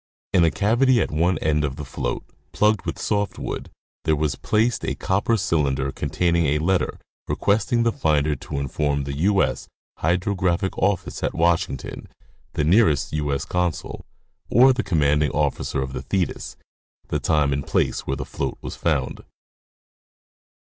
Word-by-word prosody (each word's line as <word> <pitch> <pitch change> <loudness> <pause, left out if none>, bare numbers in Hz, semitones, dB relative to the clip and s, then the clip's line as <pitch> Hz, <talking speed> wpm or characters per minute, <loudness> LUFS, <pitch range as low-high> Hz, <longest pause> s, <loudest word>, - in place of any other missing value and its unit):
In 90 - +5
a 85 - +5
cavity 120 +7 +3
at - - 0
one 85 +4 +2
end 75 -1 +1
of 70 -3 -2
the 75 -1 -6
float, - - -3 0.3
plugged 105 -4 +2
with 85 - -2
soft 105 -1 -1
wood, - - -5 0.3
there 80 -1 +2
was 75 -1 0
placed 110 +3 0
a - - -1
copper 105 +4 +1
cylinder 70 -8 0
containing 85 0 0
a 75 +2 +2
letter 90 +4 0 0.3
requesting 110 +3 +1
the 115 - +2
finder 75 -5 +1
to 70 +2 -6
inform 70 +1 -1
the 70 0 -4
U. 95 +4 +3
S. - - -3 0.3
Hydrographic 90 +2 0
office 100 -2 -1
at - - -1
Washington, 85 -3 0 0.5
the 75 - 0
nearest 80 - +3
U.S. 75 -2 -1
Con 90 -2 0
sul, - - -8 0.5
or 130 +4 +6
the 125 - -1
commanding 75 -4 +2
officer 70 - 0
of 65 0 -6
the 65 - -4
Thetis, 90 +6 -2 0.5
the - - 0
time 75 -3 +2
and 70 +1 -3
place - - 0
where 70 - -1
the 65 - -4
float - - -4
was - - -7
found. - - -1
80 Hz, 160 wpm, -23 LUFS, 75-100 Hz, 0.5 s, or